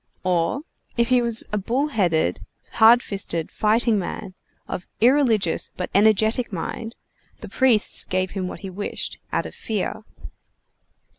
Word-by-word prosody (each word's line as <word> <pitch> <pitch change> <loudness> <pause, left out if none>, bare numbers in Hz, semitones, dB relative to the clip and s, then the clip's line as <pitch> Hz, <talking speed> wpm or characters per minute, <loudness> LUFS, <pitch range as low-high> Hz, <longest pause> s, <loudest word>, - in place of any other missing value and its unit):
Or, 180 +7 0 0.4
if 235 0 +2
he 250 -1 +4
was 235 -1 +3
a 210 - +1
bull 255 +9 -1
headed, 160 - 0 0.3
hard 235 +2 +6
fisted, 180 -5 -3
fighting 220 0 +2
man, 185 0 -6 0.3
of 180 - -6
irreligious 235 - +2
but 180 - -4
energetic 220 +4 +3
mind, 225 +5 -5 0.5
the - - -7
priests 250 -6 +3
gave 185 0 -2
him 190 -2 -3
what - - -8
he 195 - -6
wished, 205 +3 -3
out - - -1
of - - -8
fear. 215 -2 -3
215 Hz, 140 wpm, -23 LUFS, 185-235 Hz, 0.5 s, hard